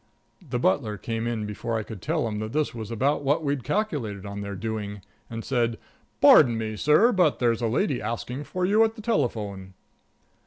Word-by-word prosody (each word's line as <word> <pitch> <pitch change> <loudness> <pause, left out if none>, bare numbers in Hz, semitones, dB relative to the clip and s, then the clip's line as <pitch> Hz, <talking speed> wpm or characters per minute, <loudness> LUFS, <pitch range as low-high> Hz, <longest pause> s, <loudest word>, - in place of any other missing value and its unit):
The - - -1
butler 105 +3 +1
came 115 +2 -3
in 115 -3 -2
before 110 +2 -3
I 110 - -2
could 105 -3 -9
tell 115 - 0
him 105 -1 -3
that 110 +1 -5
this 150 0 0
was 110 -3 -6
about 130 +6 0
what 145 +4 +1
we'd 140 -3 -1
calculated 125 - -2
on 100 0 -6
their 100 0 -5
doing, 105 -1 -4 0.3
and 115 -1 -6
said: 120 -3 +1
"Beg - - -12 0.4
pardon, 115 -6 +5
sir, 155 - +4
but 180 -8 +3
there's 120 -1 +1
a 115 - +1
lady 130 - 0
asking 120 +5 -4
for 185 0 -2
you 210 +4 +4
at 225 0 0
the 215 - -10
telephone." 105 - -2
115 Hz, 195 wpm, -26 LUFS, 105-145 Hz, 0.4 s, pardon